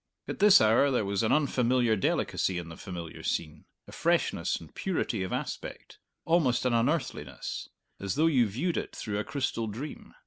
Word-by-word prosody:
At - - -5
this 205 -1 +8
hour 110 +6 +4
there 125 -6 +1
was 100 -1 0
an 110 - +1
unfamiliar 125 -5 +2
delicacy 95 -2 0
in 85 -1 -5
the 80 - -8
familiar 85 -3 -7
scene, 80 -1 -3 0.2
a - - -11
freshness - - +1
and 80 - -10
purity 160 - -1
of 95 - -3
aspect - - -5 0.3
almost 135 -8 +2
an 125 - +2
unearthliness 125 +8 -2 0.3
as 100 -1 -3
though 155 +3 +3
you 130 -8 +4
viewed 145 - -1
it - - -4
through 105 -2 -3
a - - -1
crystal 125 -5 -2
dream. 125 +8 -7
115 Hz, 175 wpm, -29 LUFS, 100-140 Hz, 0.3 s, this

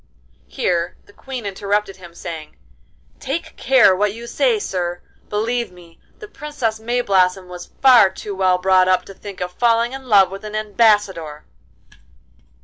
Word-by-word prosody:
Here 170 -1 -2
the 205 - -20
Queen 255 -2 -7
interrupted 200 0 -2
him, 175 -2 -14
saying, 160 -3 -8 0.6
'Take 320 +4 -4
care 255 -8 +4
what 205 +2 0
you 235 +1 -9
say, 465 - +1
sir. 175 - -3 0.3
Believe 230 +1 -1
me, 175 -2 -17 0.2
the 425 - -10
Princess 295 - -4
Mayblossom 195 -6 +1
was 180 -1 -10
far 245 -7 +7
too 200 +2 -7
well 185 -1 +2
brought 185 0 +3
up 185 0 +2
to 195 - -11
think 200 0 -10
of 180 0 -3
falling 235 +4 +1
in 265 -1 -9
love 195 -3 +5
with 195 +1 -8
an 215 0 -7
Ambassador. 205 -8 +1
205 Hz, 150 wpm, -20 LUFS, 185-235 Hz, 0.6 s, far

